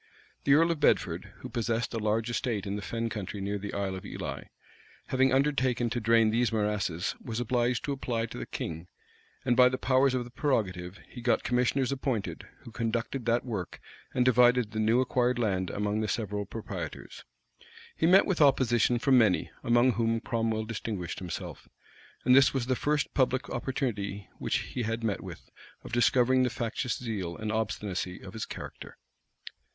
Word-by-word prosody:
The 140 - +6
earl 165 +2 +4
of 165 - -2
Bedford, 145 - +1
who - - -6
possessed 115 0 -1
a 115 - -1
large 110 +2 0
estate 115 -4 -1
in 100 0 -3
the 105 - -4
fen 115 +3 -3
country 105 -2 -5
near 100 +1 -2
the 100 +1 -6
Isle 100 -1 -1
of 95 - -6
Ely, - - -6 0.6
having 130 0 +3
undertaken 130 -3 +1
to 120 - -1
drain 115 -1 +4
these 120 +1 +2
morasses, 105 -6 -1
was 115 -1 -4
obliged 120 +1 0
to 150 - -2
apply 120 -4 -2
to - - -8
the - - -6
king; 80 +1 -5 0.6
and 125 -2 +3
by 125 0 +7
the 130 - -2
powers 130 0 +3
of 125 - 0
the 120 - -12
prerogative, 95 -10 -1
he 120 - -10
got 120 0 +2
commissioners 125 +2 +1
appointed, 130 -6 -3
who 115 - -11
conducted 115 +2 -2
that 120 +2 +2
work, 100 -8 -4 0.3
and 125 - +1
divided 125 -2 +4
the 110 - -3
new 110 +3 +3
acquired 125 -1 +1
land 95 -6 0
among 105 +1 -1
the 110 - -1
several 105 -2 -2
proprietors. 115 +2 -7 0.7
He 160 - +2
met 190 +3 +7
with 185 -5 0
opposition 125 -4 +4
from 130 +1 +4
many, 105 -6 +2
among 120 +2 +4
whom 115 -1 0
Cromwell 115 -2 -1
distinguished 105 -5 -4
himself; 90 -3 -7 0.6
and 125 +1 +6
this 135 0 +5
was 130 -3 0
the 130 +1 +1
first 150 +3 0
public 130 -1 +1
opportunity 105 -7 -3
which - - 0 0.2
he 125 - -2
had 115 0 -2
met 105 -3 -1
with, 90 -4 -10 0.3
of - - -9
discovering 125 +1 +4
the 125 - +2
factious 115 +1 -2
zeal 100 -8 -4
and 110 0 -3
obstinacy 105 -4 -2
of 95 -1 -9
his 110 - -4
character. - - -9
115 Hz, 180 wpm, -29 LUFS, 105-125 Hz, 0.7 s, by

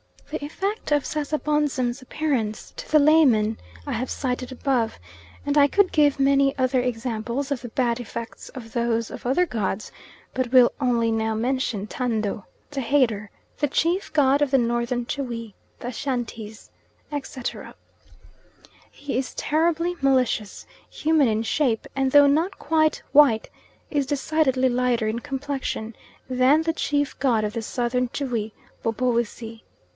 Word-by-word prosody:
The 310 - -4
effect 390 +5 -3
of 290 -2 +2
Sasabonsum's 295 -4 -1
appearance 255 -6 -2
to - - -8
the 310 - +5
layman 265 -8 +4 0.3
I - - -4
have 255 +2 -2
cited 255 -1 -3
above, 255 -3 0 0.5
and 285 +1 +1
I 285 -1 +7
could 395 +5 +3
give 290 -2 +3
many 275 0 +3
other 260 0 +2
examples 245 +2 -2
of 270 -4 -1
the 240 - -6
bad 240 -1 0
effects 235 0 -7
of 230 -4 -10
those 230 -1 0
of - - -9
other 295 +8 +3
gods, 215 - -3 0.4
but 255 -2 -2
will 255 -2 +7
only 235 -3 +2
now 220 0 0
mention 235 -3 -1
Tando, 215 -4 -2 0.3
the 275 -2 -2
Hater, 230 -6 +1 0.3
the 295 - +2
chief 340 +7 0
god 285 -2 +4
of 290 - +3
the 270 - +4
Northern 240 0 0
Tschwi, 235 -5 -4 0.3
the 245 - -5
Ashantees, 230 -3 -5 0.4
etc. 270 -3 -5 1.1
He 280 -4 -5
is 260 0 -3
terribly 335 +3 0
malicious, 255 -6 +1 0.2
human 310 -3 +2
in 220 0 0
shape, 235 -1 0
and 270 -1 +1
though 290 0 +8
not 325 +7 +1
quite 310 0 +1
white, 275 -7 +5 0.4
is 285 -3 0
decidedly 275 -3 +1
lighter 245 -2 +1
in 220 +2 -1
complexion 270 -4 -4 0.3
than 260 +4 +3
the 325 0 0
chief 290 -2 -1
god 235 -6 +2
of 210 0 -2
the 230 - -3
Southern 245 +2 -1
Tschwi, 235 -5 -3 0.3
Bobowissi. 230 -1 -1
255 Hz, 145 wpm, -24 LUFS, 230-290 Hz, 1.1 s, though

